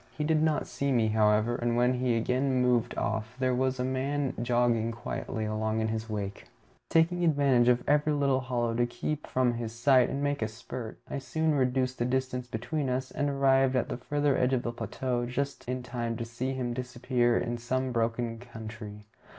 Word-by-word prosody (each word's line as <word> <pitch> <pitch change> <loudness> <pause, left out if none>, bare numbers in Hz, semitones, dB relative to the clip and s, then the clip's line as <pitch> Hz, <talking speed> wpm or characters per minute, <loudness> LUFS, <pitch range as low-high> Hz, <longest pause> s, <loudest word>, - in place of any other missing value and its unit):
He 150 - -1
did 155 0 +2
not 155 -1 +1
see 140 0 -2
me, 115 -4 +3
however, 110 +2 +3
and 120 0 0
when 125 +1 +3
he 125 -1 +1
again 130 +3 +1
moved 125 -1 +2
off 110 +2 -2
there 130 -1 +1
was 130 +1 0
a - - +1
man 135 +2 -1
jogging 120 -1 +2
quietly 110 -1 -4
along 110 +1 -1
in 110 0 0
his 110 0 -3
wake. 100 -2 -4 0.4
Taking 170 +2 +3
advantage 140 -6 +4
of 125 0 +4
every 150 +1 +3
little 140 -2 +2
hollow 120 -2 -1
to 120 +1 +1
keep 150 +5 -4
from 130 -2 +2
his 115 -1 -5
sight 130 +1 +4
and 140 +1 -2
make 145 -2 0
a 110 - +1
spurt, 115 +1 -7
I - - -3
soon 160 +3 0
reduced 130 -1 +1
the 120 - +1
distance 125 0 -1
between 125 +5 -2
us, 130 +1 -2
and 145 - -1
arrived 135 -1 +3
at 125 - 0
the - - -3
further 145 +2 0
edge 125 +1 +2
of 125 -1 +1
the 120 - -2
plateau 120 0 -2
just 140 +1 -3
in 125 0 -2
time 120 -2 -3
to 115 - -3
see 120 +3 -3
him 125 -2 -2
disappear 125 -1 0
in 120 0 -2
some 130 +2 -1
broken 115 0 -1
country. 110 -3 -9
125 Hz, 200 wpm, -29 LUFS, 115-135 Hz, 0.4 s, advantage